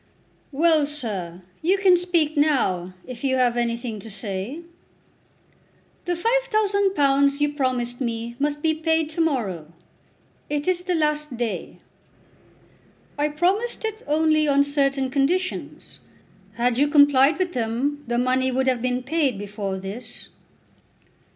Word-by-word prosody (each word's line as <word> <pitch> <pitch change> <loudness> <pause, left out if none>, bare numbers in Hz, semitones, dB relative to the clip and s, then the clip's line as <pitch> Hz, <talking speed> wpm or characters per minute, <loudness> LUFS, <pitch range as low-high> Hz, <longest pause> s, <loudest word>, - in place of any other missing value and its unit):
"Well, 310 0 +3
sir; 195 - -4 0.2
you 370 +5 +2
can 385 -2 +5
speak 340 -4 +1
now, 230 - +1
if 250 -1 -9
you 265 -1 +1
have 250 -2 +2
anything 235 -2 -2
to 225 - -10
say." 200 - -5 1.4
"The 355 - 0
£5000 390 - +2
you 295 0 +1
promised 255 -3 -2
me 235 -1 -3
must 295 +1 -1
be 320 -1 +3
paid 320 0 0
to 330 - -1
morrow. 200 - -1 0.8
It 290 +1 -2
is 365 -1 +2
the 360 0 -1
last 300 -4 0
day." 235 -2 -4 1.4
"I 295 +1 +1
promised 375 +11 0
it 440 0 -4
only 310 0 +2
on 280 0 +4
certain 275 -2 0
conditions. 350 +7 -2 0.5
Had 240 +1 0
you 290 - +4
complied 285 -1 +5
with 365 -1 -1
them 250 +5 -2
the 240 0 -1
money 255 +1 +1
would 260 +1 0
have 255 -2 +1
been 250 0 -1
paid 280 -4 0
before 200 -1 -4
this." 210 +5 -8
280 Hz, 130 wpm, -23 LUFS, 240-315 Hz, 1.4 s, can